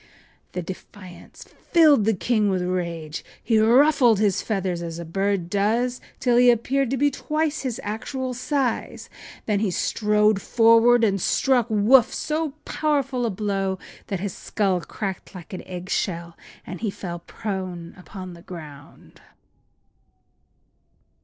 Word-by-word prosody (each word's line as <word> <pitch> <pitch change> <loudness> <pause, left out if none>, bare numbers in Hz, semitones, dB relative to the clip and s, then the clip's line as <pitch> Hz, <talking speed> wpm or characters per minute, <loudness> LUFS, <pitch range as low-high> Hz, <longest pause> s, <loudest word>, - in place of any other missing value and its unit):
” - - -37
The 180 - -3
defiance 185 +1 -11
filled 300 -10 +3
the 220 -1 +2
king 215 +2 +1
with 185 -2 0
rage. 170 -4 -3 0.2
He 225 -2 +3
ruffled 245 +1 +5
his 200 -2 +1
feathers 190 -5 -2
as 165 -1 -5
a 170 - -6
bird 195 +1 -1
does, 225 +6 0 0.2
till 245 -2 +2
he 245 0 +6
appeared 255 +3 +1
to 270 - -1
be 290 +2 +2
twice 305 +2 -2
his 250 -4 -3
actual 255 +5 -4
size, 255 -1 -2
and - - -16
then 210 -2 +1
he 210 -1 0
strode 210 +2 +1
forward 230 +1 +5
and 195 -3 +2
struck 250 +1 +2
Woof 220 +4 +5
so 310 -1 -2
powerful 275 -5 0
a - - 0
blow 195 -1 -2 0.3
that 195 - -3
his 200 -2 -3
skull 195 -4 -1
crackled 195 +1 -6
like 185 +3 -10
an 185 - -5
egg 180 0 -7
shell 170 -3 -2 0.3
and 180 -1 -8
he 220 - 0
fell 175 -3 -6
prone 185 -2 -6
upon 185 -1 -9
the 170 - -13
ground. 150 -6 -12
210 Hz, 145 wpm, -23 LUFS, 185-245 Hz, 0.3 s, he